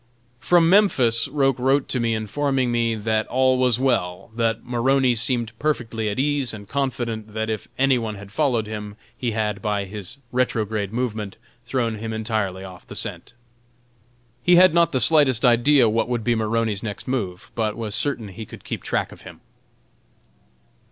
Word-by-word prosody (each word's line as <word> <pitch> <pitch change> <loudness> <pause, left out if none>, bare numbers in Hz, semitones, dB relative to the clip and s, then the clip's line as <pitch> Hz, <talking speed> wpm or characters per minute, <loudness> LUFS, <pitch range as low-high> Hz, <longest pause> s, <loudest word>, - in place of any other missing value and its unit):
From 165 +7 +4
Memphis 135 - +4
Roch 135 -3 +1
wrote 135 +2 +2
to 130 - 0
me, 115 -1 +1
informing 130 +4 -1
me 115 -1 +1
"that 110 0 -1
all 130 0 +2
was 125 -2 +2
well; 115 -7 -1
that 115 -1 -1
Maroney 125 +1 +2
seemed 120 -1 -1
perfectly 115 -7 -1
at 100 - -4
ease 140 -3 0
and 100 -2 -11
confident 120 -5 -3
that 110 0 -1
if 110 - -4
any 135 -1 +3
one 110 -2 -4
had 100 -1 -11
followed 120 -4 +1
him, 105 -1 -6 0.2
he 120 -3 -2
had, 105 -2 -2
by 105 -1 -1
his 105 +4 -7
retrograde 110 -5 -1
movement, 110 -4 -3 0.3
thrown 115 -3 -1
him 110 0 -4
entirely 110 -4 -2
off 95 -2 -11
the - - -9
scent." - - -6 1.1
He 175 +7 +5
had 180 -1 +7
not 170 -2 +4
the 130 - +1
slightest 130 -1 +4
idea 125 +2 +5
what 115 +2 0
would 120 -2 -1
be 120 - +2
Maroney's 110 -2 0
next 105 -3 -6
move, 100 -8 -3
but 110 -2 -1
was 110 -3 -4
certain 120 -6 -2
he 105 +3 -9
could - - -12
keep - - -5
track - - -2
of - - -13
him. - - -12
115 Hz, 170 wpm, -23 LUFS, 110-130 Hz, 1.1 s, had